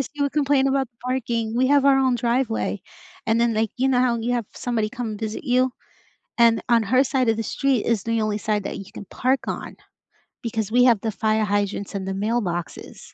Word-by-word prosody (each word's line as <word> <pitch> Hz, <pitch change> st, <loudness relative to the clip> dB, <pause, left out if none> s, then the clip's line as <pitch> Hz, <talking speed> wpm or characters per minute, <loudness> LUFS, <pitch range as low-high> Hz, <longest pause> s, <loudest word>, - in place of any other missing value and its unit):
Yes, -, -, -8 dB
she 290 Hz, -, -2 dB
would 280 Hz, -, 0 dB
complain 285 Hz, -2 st, +2 dB
about 270 Hz, -1 st, 0 dB, 0.2 s
parking. 235 Hz, -3 st, -2 dB
We 260 Hz, -, +3 dB
have 280 Hz, 0 st, +4 dB
our 275 Hz, -1 st, +5 dB
own 260 Hz, -2 st, +2 dB
driveway, 235 Hz, 0 st, -1 dB, 0.5 s
and 225 Hz, +1 st, +2 dB
then, 235 Hz, -1 st, +2 dB
like, 220 Hz, -1 st, 0 dB
you 265 Hz, +2 st, +1 dB
know 255 Hz, -2 st, +3 dB
how 250 Hz, -2 st, +2 dB
you 235 Hz, +2 st, -1 dB
have 240 Hz, -3 st, -1 dB
somebody 230 Hz, -3 st, -1 dB
come 220 Hz, -1 st, -5 dB
visit 220 Hz, +3 st, -5 dB
you? 255 Hz, -1 st, +2 dB, 0.7 s
And 230 Hz, -1 st, +4 dB
on 235 Hz, -1 st, +4 dB
her 255 Hz, +6 st, +3 dB
side 260 Hz, -3 st, +1 dB
of 225 Hz, -, +1 dB
the 225 Hz, -, -2 dB
street 270 Hz, -1 st, 0 dB
is 230 Hz, -4 st, 0 dB
the 230 Hz, -1 st, 0 dB
only 215 Hz, -1 st, 0 dB
side 210 Hz, -1 st, -1 dB
that -, -, -5 dB
you 195 Hz, -, -10 dB
can -, -, -8 dB
park 260 Hz, +7 st, 0 dB
on -, -, -5 dB, 0.7 s
because 220 Hz, -2 st, -3 dB
we 245 Hz, +1 st, +5 dB
have 235 Hz, -5 st, +4 dB
the 220 Hz, -, -2 dB
fire 215 Hz, 0 st, +1 dB
hydrants 205 Hz, 0 st, -2 dB
and 190 Hz, -1 st, -4 dB
the 195 Hz, -, -2 dB
mailboxes, 195 Hz, -4 st, -4 dB
235 Hz, 220 wpm, -23 LUFS, 215-255 Hz, 0.7 s, our